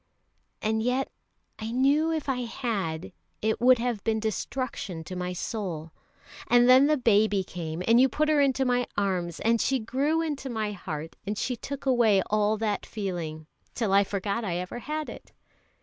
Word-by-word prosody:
And 220 +1 +1
yet 250 +3 0 0.5
I 220 +1 -4
knew 280 +6 +3
if 315 -3 -2
I 265 -2 0
had, 195 -10 -3 0.3
it 220 +1 0
would 255 +1 +7
have 235 -3 -2
been 220 -1 +1
destruction 220 -5 -3
to 185 - -7
my 180 0 -3
soul. 175 -4 -4 0.6
And 245 0 +5
then 260 +2 +7
the 305 0 +3
baby 210 -5 +3
came, 170 -1 -5
and 230 +2 +6
you 265 - +5
put 305 +5 0
her 305 -2 +4
into 270 -1 +2
my 245 -1 +1
arms, 180 -4 -1
and 230 0 +2
she 270 - +2
grew 275 +8 0
into 290 -4 -3
my 220 -3 -2
heart, 165 -5 -6
and 205 +1 -3
she 250 - -1
took 280 +4 -7
away 230 -7 +4
all 215 0 +2
that 210 -1 -1
feeling, 170 -7 -4 0.3
till 220 -5 0
I 200 +1 +6
forgot 200 +3 -2
I 180 -5 -2
ever 180 +6 -5
had 305 +4 -4
it." - - -11
220 Hz, 180 wpm, -27 LUFS, 195-255 Hz, 0.6 s, would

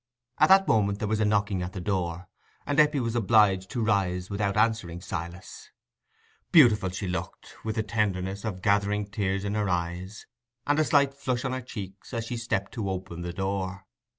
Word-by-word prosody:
At - - +5
that 195 0 +6
moment 100 -3 +2
there 105 - -2
was 110 0 0
a 110 - +2
knocking 105 -2 +1
at 90 +1 -5
the 95 - -5
door; 90 -2 -2 0.4
and 145 +1 0
Eppie 150 -1 +4
was 115 -1 -2
obliged 100 -4 +3
to 120 -3 -2
rise 95 -3 0
without 100 0 -1
answering 110 -6 +1
Silas. 85 0 -7 0.8
Beautiful 110 - +6
she 95 +2 -4
looked, 90 - -6
with 110 -1 -3
the 110 - 0
tenderness 100 -3 -1
of 95 -5 -5
gathering 105 0 +2
tears 100 -1 -2
in 100 - -2
her 105 -2 0
eyes 90 +3 -3 0.4
and 145 +1 +2
a 155 - +3
slight 140 -3 +3
flush 130 -3 -2
on 130 - -1
her 130 - -3
cheeks, 100 -1 -8
as 115 -1 -2
she 120 +1 -4
stepped 100 -4 -2
to 105 -5 -3
open 90 -2 -5
the 85 0 -4
door. 95 +1 -3
100 Hz, 190 wpm, -27 LUFS, 95-115 Hz, 0.8 s, that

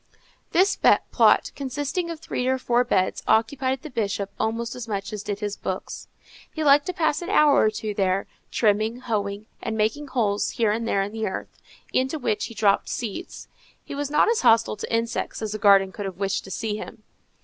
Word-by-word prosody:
This 380 +4 +3 0.3
plot, - - +4
consisting 290 +6 -3
of 330 -2 -5
three 250 -5 -3
or 260 0 +2
four 245 -1 +2
beds, 190 -6 0
occupied 260 +5 +1
the 310 - -7
Bishop 200 -3 -2
almost 225 +1 -1
as 245 -2 -7
much 200 -1 -4
as 210 - -4
did 205 0 -4
his 205 -1 -2
books. 190 0 -5 0.4
He 315 - -3
liked 285 0 +5
to 365 - -2
pass 315 -2 0
an 350 - -5
hour 305 -8 +5
or 215 - +4
two 215 0 -4
there, 195 -1 0 0.2
trimming, 220 +2 +1
hoeing, 205 -3 -2 0.2
and 220 - -3
making 225 +8 0
holes 210 -6 0
here 225 -3 +3
and 230 +2 -2
there 195 -3 +1
in 200 - -5
the 220 -1 -2
earth, 190 - -6 0.4
into 265 +4 +1
which 215 -7 -1
he 230 - -9
dropped 205 -2 +2
seeds. 240 - -5 0.4
He - - -7
was 285 0 -3
not 300 - +4
as 460 0 +2
hostile 225 -1 +4
to - - -6
insects 230 +1 -1
as 215 -2 -3
a 215 - -4
gardener 195 -1 +5
could 205 +1 -6
have 185 -2 -7
wished 195 0 -1
to - - -10
see 210 +2 -3
him. 215 - -9
225 Hz, 205 wpm, -24 LUFS, 205-265 Hz, 0.4 s, liked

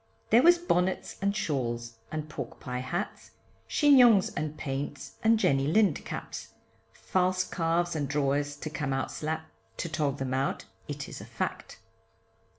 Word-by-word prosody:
There 230 +3 +7
was 345 +4 +7
bonnets 190 - 0
& 200 - +2
shawls, 120 - -2
& 155 -1 -3
pork 135 -5 -6
pie 125 0 -4
hats 170 +11 -4 0.4
Chignons 250 - +6
and 155 0 -3
paints, 140 -1 -4
and 225 0 +5
Jenny 135 -9 +2
Lind 185 -1 +3
caps, - - -6 0.4
False 185 0 +1
calves 170 0 0
and 145 -3 -1
drawers, 145 0 0
to 155 +1 -6
come 145 -3 -2
out 135 0 -1
slap, 160 +1 -4 0.3
To - - -2
tog 150 -3 0
them 135 -1 -2
out, 135 +1 -1 0.2
it - - -5
is - - -8
a - - -9
fact. - - -4
155 Hz, 155 wpm, -29 LUFS, 135-185 Hz, 0.4 s, There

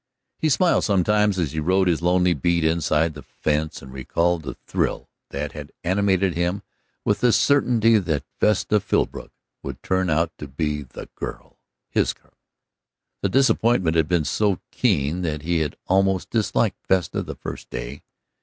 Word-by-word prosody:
He 155 - +1
smiled 175 +5 +3
sometimes 105 +1 +2
as 80 -7 0
he 80 - -3
rode 95 +4 +2
his 85 -2 +1
lonely 90 0 +3
beat 85 +3 +1
inside 80 0 +1
the 75 - -9
fence 75 +1 -2
and 65 -1 -11
recalled 85 +6 0
the 70 - -6
thrill - - -2 0.2
that 70 +1 -4
had 75 -1 -9
animated 95 0 +2
him 90 +4 -1 0.4
with 105 - +1
the 125 - +4
certainty 115 -5 +4
that 80 -7 -1 0.2
Vesta 105 0 +2
Philbrook - - -1 0.3
would - - -7
turn 95 -1 0
out 80 +1 +1
to 75 - -6
be 75 +2 -2
the 65 - -10
girl, - - -8 0.3
his - - +1
girl. - - -31 0.9
The 100 - +1
disappointment 115 -8 +3
had 80 -2 +3
been 85 -3 +1
so 100 +7 +1
keen 75 +6 +1
that 75 -4 -3
he 85 0 +1
had 75 -2 -2
almost 95 0 +1
disliked 110 -3 0
Vesta 90 -4 +1
that - - -8
first - - -7
day. - - -6
85 Hz, 165 wpm, -23 LUFS, 75-100 Hz, 0.9 s, the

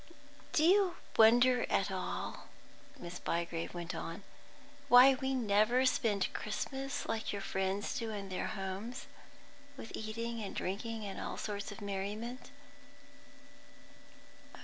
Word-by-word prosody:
"Do 305 - +3
you 370 +1 +5 0.2
wonder 245 +3 +6
at - - +1
all," - - -4 0.5
Miss 175 0 -7
Bygrave 170 0 -2
went 175 0 -4
on, 165 +3 -6 0.6
"why 255 +1 +9
we 265 0 -1
never 230 +2 +3
spend 210 -6 +1
Christmas 270 +5 -3
like 220 0 -2
your 200 -1 -4
friends 190 +1 -1
do 230 -2 -3
in 200 -2 -5
their 185 - -2
homes, 195 +3 -5 0.7
with 225 - -8
eating 230 +1 -4
and 200 - -5
drinking 220 +3 -3
and 195 - -5
all - - -4
sorts 205 -1 -4
of 205 - -9
merriment?" 205 +5 -4
215 Hz, 125 wpm, -34 LUFS, 195-245 Hz, 0.7 s, why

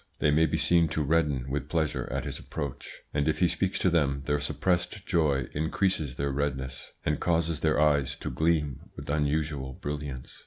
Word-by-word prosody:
They 75 - +3
may 80 +2 +4
be 80 - 0
seen 85 +1 +4
to 75 - +2
redden 75 -4 +1
with 70 +2 -3
pleasure 80 -2 0
at - - -2
his - - -4
approach, 70 -3 -6
and 75 +1 +1
if 80 - +2
he 90 - +4
speaks 95 +3 0
to 90 - +2
them 70 -4 +2
their 75 0 +1
suppressed 90 +4 -1
joy 70 -6 +2
increases 80 -2 0
their 70 +1 -1
redness, 65 -2 -3
and 75 0 +1
causes 85 -2 +1
their 75 -1 +2
eyes 75 -3 +3
to - - -5
gleam 75 0 0
with - - -5
unusual 75 -2 0
brilliance. 70 -2 -6
75 Hz, 185 wpm, -28 LUFS, 70-80 Hz, -, may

